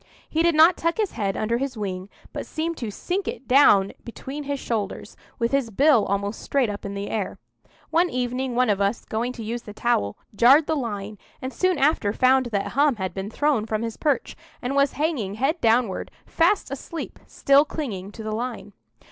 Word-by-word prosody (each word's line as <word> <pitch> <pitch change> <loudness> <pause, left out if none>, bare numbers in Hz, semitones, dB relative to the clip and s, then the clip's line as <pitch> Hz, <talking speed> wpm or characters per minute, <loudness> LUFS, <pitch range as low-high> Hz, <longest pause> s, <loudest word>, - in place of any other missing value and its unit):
He 320 - 0
did 340 -1 +3
not 320 +3 +6
tuck 335 0 0
his 430 -3 0
head 200 -4 -2
under 230 +2 0
his 270 -2 -3
wing, 190 -2 -4 0.2
but - - -5
seemed 330 +1 -3
to 230 - -4
sink 365 - -3
it 265 - -5
down 210 -8 +5
between 275 +5 -7
his 280 0 -2
shoulders, 215 -6 -4 0.2
with 235 0 0
his 275 -4 +1
bill 260 +1 +4
almost 200 +2 -2
straight 260 -6 +1
up 205 - -7
in 200 0 -5
the 200 +1 -4
air. 210 -4 -3 0.5
One 345 +2 +3
evening 250 0 -2
one 250 -3 +3
of 200 -1 0
us, 200 +3 0
going 235 +3 -2
to 235 - -7
use 235 +2 -4
the 210 - -10
towel, 100 - 0 0.2
jarred 270 +8 +6
the 315 - 0
line, 210 -6 -4 0.2
and 260 0 -5
soon 370 -2 +1
after 270 -8 +2
found 260 +1 +3
that 205 -4 -2
Hum 285 0 +3
had 190 -3 -4
been 195 +1 -5
thrown 270 -3 +1
from 215 0 -1
his 230 -1 -4
perch, 295 -3 -1 0.2
and 250 +2 -3
was 280 -1 +3
hanging 280 - -1
head 280 +9 0
downward, 230 -3 +2 0.2
fast 335 -2 +1
asleep, 305 +4 -6
still 280 +1 +4
clinging 215 - -5
to 225 - -8
the 215 0 -3
line. 230 -2 -5
245 Hz, 200 wpm, -24 LUFS, 210-285 Hz, 0.5 s, not